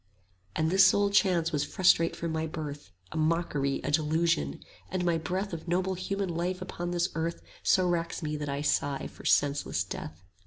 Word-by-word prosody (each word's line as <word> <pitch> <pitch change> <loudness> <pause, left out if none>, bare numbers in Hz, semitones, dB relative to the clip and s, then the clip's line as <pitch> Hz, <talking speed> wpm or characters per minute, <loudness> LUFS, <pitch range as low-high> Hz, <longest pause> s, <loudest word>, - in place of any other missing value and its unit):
30 - - -2
And 160 - +1
this 190 0 +7
sole 200 +1 +3
chance 180 -4 +3
was 145 -2 +1
frustrate 165 +1 +3
from 170 -1 -3
my 160 0 -1
birth, 150 - -6 0.2
A - - -5
mockery, 155 -4 0
a 145 - -1
delusion; 155 - +1 0.3
and 180 -1 -1
my 170 -2 +2
breath 185 +4 -3
Of 165 +1 -6
noble 185 +2 +1
human 195 +1 -2
life 175 +2 -2
upon 175 -1 -5
this 175 +1 0
earth 165 +1 -3 0.2
So 185 -1 +3
racks 170 -1 -1
me 150 0 -2
that 150 -1 -4
I 140 +1 -2
sigh 145 -1 0
for - - -11
senseless 145 0 +2
death. 80 +3 -7
165 Hz, 190 wpm, -29 LUFS, 150-180 Hz, 0.3 s, this